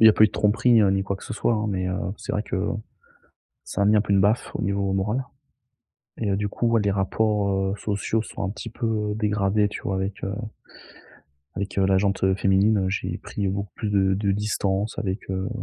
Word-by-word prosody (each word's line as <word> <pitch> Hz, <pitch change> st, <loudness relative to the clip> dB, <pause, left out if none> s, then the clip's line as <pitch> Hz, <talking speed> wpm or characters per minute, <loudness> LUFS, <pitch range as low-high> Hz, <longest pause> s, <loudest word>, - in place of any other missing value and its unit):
Il 110 Hz, -, +8 dB
y -, -, +11 dB
a -, -, +3 dB
pas 110 Hz, -, +6 dB
eu -, -, +5 dB
de -, -, -20 dB
tromperie, 115 Hz, +3 st, +4 dB
heu, 100 Hz, -2 st, +4 dB
ni 95 Hz, 0 st, +1 dB
quoi 100 Hz, 0 st, -2 dB
que -, -, -12 dB
ce 130 Hz, -, -6 dB
soit 120 Hz, -, +1 dB
hein, 110 Hz, 0 st, -1 dB
mais, 95 Hz, -2 st, -1 dB
heu, 90 Hz, -, -1 dB, 0.2 s
c'est -, -, -6 dB
vrai 105 Hz, -, 0 dB
que 105 Hz, -, -4 dB, 1.1 s
ça -, -, -6 dB
m'a 100 Hz, +1 st, +4 dB
mis, -, -, +5 dB
un -, -, +4 dB
peu 105 Hz, -, -3 dB
une 100 Hz, -, +5 dB
baffe 105 Hz, +4 st, +1 dB
au -, -, -2 dB
niveau 100 Hz, 0 st, 0 dB
moral 105 Hz, +7 st, 0 dB, 1.0 s
et 105 Hz, -3 st, -1 dB
heu, 100 Hz, -, +1 dB
du 105 Hz, +1 st, -1 dB
coup, 115 Hz, +3 st, -1 dB
ouais 115 Hz, -1 st, +3 dB
les 100 Hz, -, +1 dB
rapports, 100 Hz, +1 st, +1 dB
heu, 95 Hz, 0 st, 0 dB
sociaux 105 Hz, +2 st, -1 dB
sont -, -, -7 dB
un -, -, -1 dB
petit 115 Hz, +3 st, -7 dB
peu, 110 Hz, -2 st, -1 dB
dégradés 105 Hz, -1 st, +1 dB
tu -, -, -7 dB
vois, 95 Hz, -, -1 dB
avec, 95 Hz, +1 st, -3 dB
heu 100 Hz, -, -2 dB, 1.2 s
avec, 100 Hz, +1 st, -3 dB
heu, 95 Hz, -, +4 dB
la 95 Hz, 0 st, +3 dB
jante, 100 Hz, 0 st, 0 dB
heu, 95 Hz, 0 st, +3 dB
féminine, 100 Hz, +2 st, +3 dB
heu, 95 Hz, -1 st, 0 dB
j'ai 95 Hz, -, -2 dB
pris 100 Hz, -, -4 dB
beaucoup 100 Hz, +1 st, -3 dB
plus 105 Hz, -, -3 dB
de 95 Hz, -2 st, +3 dB
de 100 Hz, 0 st, +1 dB
distance 105 Hz, 0 st, -1 dB
avec, 95 Hz, -1 st, -3 dB
heu, 95 Hz, 0 st, -2 dB
100 Hz, 240 wpm, -24 LUFS, 95-105 Hz, 1.2 s, y